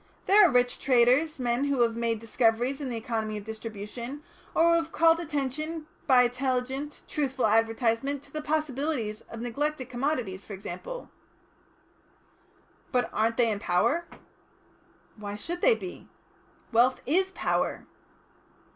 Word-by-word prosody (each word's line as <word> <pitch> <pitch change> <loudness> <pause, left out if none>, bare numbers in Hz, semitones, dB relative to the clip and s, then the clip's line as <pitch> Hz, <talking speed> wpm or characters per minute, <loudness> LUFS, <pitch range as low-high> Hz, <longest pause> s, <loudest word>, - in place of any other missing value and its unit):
There 415 +2 +7
are - - 0
rich 245 0 +2
traders, 260 +5 +3
men 245 +1 0
who 280 -3 +1
have 230 -1 +3
made 230 -1 0
discoveries 230 +4 +1
in 270 - -3
the 235 - -3
economy 220 -2 -3
of 205 - -7
distribution, 220 +5 -7 0.3
or 330 - +5
who - - +5
have 330 -1 -2
called 330 0 +4
attention 305 +1 -3 0.2
by 255 -3 +7
intelligent, 260 +3 -2
truthful 270 -4 -1
advertisement 225 +5 +1
to - - -18
the 305 - -3
possibilities 290 -7 -1
of 230 - -7
neglected 275 +3 -2
commodities, 245 -7 -2
for 210 - -9
example." 195 - -7 1.8
"But 245 -2 +1
aren't 225 +1 +1
they 235 -2 +3
a 200 - -4
power?" 285 - +1 1.1
"Why 205 -1 -6
should 345 +12 -4
they - - +5
be?" 370 -4 -9 0.6
"Wealth 245 +2 +3
is 375 +7 +2
power." - - -1
250 Hz, 140 wpm, -28 LUFS, 225-295 Hz, 1.8 s, There